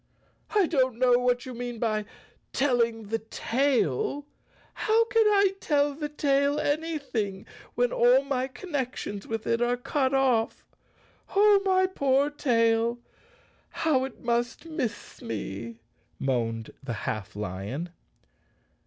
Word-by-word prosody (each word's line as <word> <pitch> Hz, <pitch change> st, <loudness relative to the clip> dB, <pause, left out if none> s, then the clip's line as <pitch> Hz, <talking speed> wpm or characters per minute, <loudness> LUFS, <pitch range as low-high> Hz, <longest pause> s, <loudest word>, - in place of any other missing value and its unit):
"I 410 Hz, -3 st, +5 dB
don't 260 Hz, -7 st, +1 dB
know 245 Hz, -1 st, +4 dB
what 245 Hz, 0 st, +1 dB
you 255 Hz, -, -6 dB
mean 245 Hz, 0 st, -5 dB
by 215 Hz, -2 st, -1 dB, 0.5 s
telling 235 Hz, -5 st, +1 dB
the 225 Hz, +1 st, 0 dB
tail. 280 Hz, -, 0 dB, 0.5 s
How 450 Hz, +1 st, +2 dB
can 455 Hz, -1 st, +3 dB
I 400 Hz, -2 st, +4 dB
tell 290 Hz, -2 st, +1 dB
the 295 Hz, +1 st, -4 dB
tail 285 Hz, 0 st, +1 dB
anything 285 Hz, -11 st, -2 dB, 0.3 s
when 245 Hz, 0 st, +2 dB
all 245 Hz, +3 st, +5 dB
my 265 Hz, -2 st, -1 dB
connec¬ 275 Hz, -4 st, -4 dB
tions 200 Hz, -1 st, -6 dB
with 225 Hz, -1 st, -4 dB
it 230 Hz, 0 st, +1 dB
are 240 Hz, +1 st, +2 dB
cut 270 Hz, +1 st, 0 dB
off? 255 Hz, -4 st, +1 dB, 0.7 s
Oh, 410 Hz, 0 st, +6 dB
my 375 Hz, -1 st, +3 dB
poor 280 Hz, -5 st, +1 dB
tail, 230 Hz, -4 st, +2 dB, 0.7 s
how 290 Hz, -5 st, +1 dB
it 265 Hz, -2 st, -7 dB
must 240 Hz, +4 st, -1 dB
miss 310 Hz, -9 st, -5 dB
me!" 115 Hz, 0 st, -5 dB, 0.4 s
moaned 115 Hz, -4 st, -1 dB
the 130 Hz, -4 st, -3 dB
half 110 Hz, -3 st, -4 dB
lion. 105 Hz, -, -4 dB
255 Hz, 125 wpm, -27 LUFS, 225-290 Hz, 0.7 s, Oh